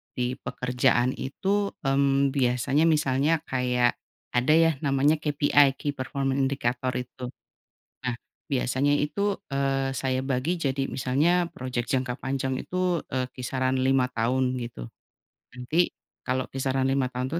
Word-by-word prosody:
di 125 0 -1
pekerjaan 125 0 +1
itu, 200 +9 -1 0.2
mmm, 140 0 +3
biasanya 135 +4 +2
misalnya 150 0 +2
kayak 125 -1 +1 0.3
ada 125 +5 +3
ya 165 0 +5
namanya 145 +1 +2
KPI 145 -2 +3
Key 145 - -2
Performance 135 0 -2
Indicator 130 -2 0
itu. 125 0 -5 0.8
Nah 125 -2 -1 0.4
biasanya 135 +2 +1
itu, 200 +7 -1
eee, 135 -1 0
saya 130 +1 0
bagi 135 +6 -1
jadi 140 -3 -1
misalnya 155 +7 +2
project 125 -2 -3
jangka 130 -1 -1
panjang 130 -1 -2
itu, 180 -1 0
eee, 130 -1 -1
kisaran 130 +1 -1
5 130 0 +3
tahun 125 +2 0
gitu, 115 - -7 0.6
nanti 125 +8 0 0.3
kalau 130 0 -1
kisaran 135 0 0
5 135 -1 +1
tahun 125 0 -3
135 Hz, 130 wpm, -26 LUFS, 125-145 Hz, 0.8 s, ya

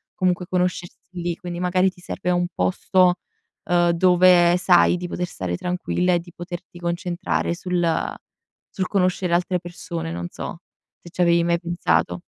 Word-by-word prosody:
comunque 180 -1 0
conoscersi 180 -2 -2
lì, 170 0 -2
quindi 175 0 -7
magari 180 +1 +2
ti 180 - -17
serve 180 0 -3
un 175 0 +1
posto, 180 - +2 0.5
uhm, 175 0 +3
dove 175 0 +5
sai 180 -1 +4
di 180 0 -5
poter 180 +1 -3
stare 90 - -4
tranquilla 180 - 0
e 175 - +2
di 175 +1 -12
poterti 175 0 -8
concentrare 175 0 -2
sul 175 -2 -1 0.5
sul 190 -2 -3
conoscere 185 -2 0
altre 180 +1 +1
persone, 175 - -6
non 85 +1 -4
so, - - -7 0.4
se 170 - -12
ci - - -17
avevi 170 -1 +4
mai 170 0 +1
pensato. 90 - 0
175 Hz, 155 wpm, -22 LUFS, 170-180 Hz, 0.5 s, dove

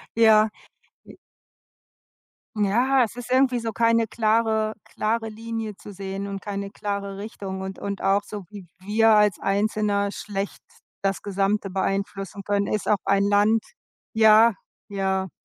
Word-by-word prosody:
Ja. 220 -1 +6 0.6
J - - -13 1.4
Ja, 240 +6 +3
es 225 - -7
ist 245 0 -8
irgendwie 255 -1 +3
so 225 -1 -3
keine 230 0 +2
klare 220 -1 +1
klare 225 +1 -2
Linie 225 -1 -5
zu 205 - -11
sehen 195 0 -5
und 195 -1 -5
keine 200 0 -5
klare 200 -1 -4
Richtung. 200 -2 -6
Und 190 0 -6
und 200 -1 -5
auch 200 +1 +3
so, 205 -2 -7
wie 200 -4 -10
wir 215 +4 +3
als 210 -2 +4
Einzelner 200 0 0
schlecht 200 -1 -5 0.4
das 195 -1 -1
Gesamte 200 0 -1
beeinflussen 195 +1 -3
können, 200 0 0
ist 210 - -2
auch 210 - +4
ein 200 0 +2
Land 205 +2 +3 0.5
Ja, 220 0 +6 0.3
ja. 190 -1 -1
205 Hz, 140 wpm, -24 LUFS, 195-220 Hz, 1.4 s, Ja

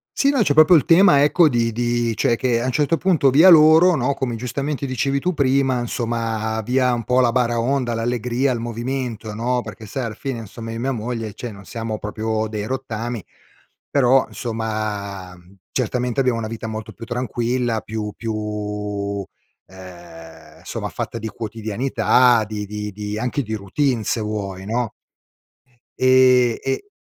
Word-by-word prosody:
Sì, 280 - +3
no, 270 -6 +3
c'è 145 - +2
proprio 155 +3 +7
il 155 - +4
tema 165 -5 +6
ecco, 155 +2 +4
di 115 -2 +1
di 120 0 0
cioè, 115 +2 +2
che 120 -1 0
a - - -2
un 130 - 0
certo 150 +5 +1
punto 165 -8 +3
via 160 +7 +7
loro 160 +2 +7
no, 135 0 0
come 130 -4 -3
giustamente 140 +4 -3
dicevi 135 +2 -1
tu 180 +5 -1
prima 135 -3 +2
insomma, 115 -2 -2
via 125 +2 +1
un 120 -1 -2
po' 125 +3 +2
la 120 -2 +4
baraonda, 120 +1 0
l'allegria, 120 +3 0
il 120 - -2
movimento 120 -1 -4
no, 120 +3 -1
perché 110 0 -10
sai 130 +5 -4
alla 110 - -4
fine, 130 +2 -5
insomma, 115 +1 -8
io 115 - -5
mia 135 +3 -1
moglie 115 -2 -4
cioè 120 - -6
non 100 -1 -13
siamo 110 -1 -4
proprio 110 +1 -2
dei 105 0 -4
rottami 120 -4 -4 0.6
però, 135 -1 +4
insomma, 105 -5 -4
mhmm, 90 +2 -20 0.2
certamente 125 0 -1
abbiamo 125 -3 +1
una 110 - -3
vita 115 0 -6
molto 110 -1 -6
più 115 - -10
tranquilla, 120 -1 -1
più 105 -1 -5
più, 105 -2 -4 0.4
ehm, 85 -3 -13
somma - - -5
fatta - - -5
di 110 - -5
quotidianità, 115 +2 +1
di 105 -1 -4
di 105 0 -5
di 105 +1 -5
anche 125 +4 -1
di 110 0 -4
routine 115 +4 -1
se 115 - -1
vuoi, 100 -3 -4
no. 115 0 -1 1.1
Ehm, 130 -2 +5
e 135 - -3
115 Hz, 165 wpm, -21 LUFS, 110-130 Hz, 1.1 s, proprio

